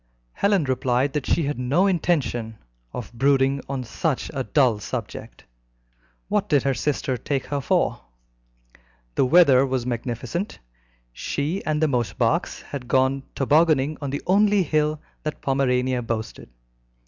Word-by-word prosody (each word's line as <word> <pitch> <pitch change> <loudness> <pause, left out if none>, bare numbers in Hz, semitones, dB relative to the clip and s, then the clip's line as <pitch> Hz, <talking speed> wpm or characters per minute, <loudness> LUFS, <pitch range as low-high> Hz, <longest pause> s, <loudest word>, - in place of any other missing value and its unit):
Helen 200 -4 +2
replied 130 0 0
that 150 -3 -2
she 170 - +2
had 145 -2 -2
no 135 +10 +2
intention 145 - 0 0.3
of 120 -1 -7
brooding 135 +2 +2
on 135 -2 -3
such 140 +4 -2
a 135 -2 -2
dull 125 -6 +2
subject. - - -6 0.8
What - - 0
did 145 -2 +3
her 135 -1 +1
sister 135 -2 -1
take 135 +1 -2
her 145 -1 -2
for? - - +1 1.1
The 130 - +2
weather 135 -4 +6
was 130 -3 -1
magnificent. 125 - -3 0.6
She 150 - -3
and 155 0 0
the - - +4
Mosebachs 125 -5 0
had 135 -4 -7
gone 130 +2 +2
tobogganing 150 0 +3
on 140 - -3
the 140 - -4
only 205 +1 +4
hill 155 -1 0 0.2
that 155 - -4
Pomerania 130 -2 +1
boasted. 110 - -5
135 Hz, 135 wpm, -23 LUFS, 125-155 Hz, 1.1 s, weather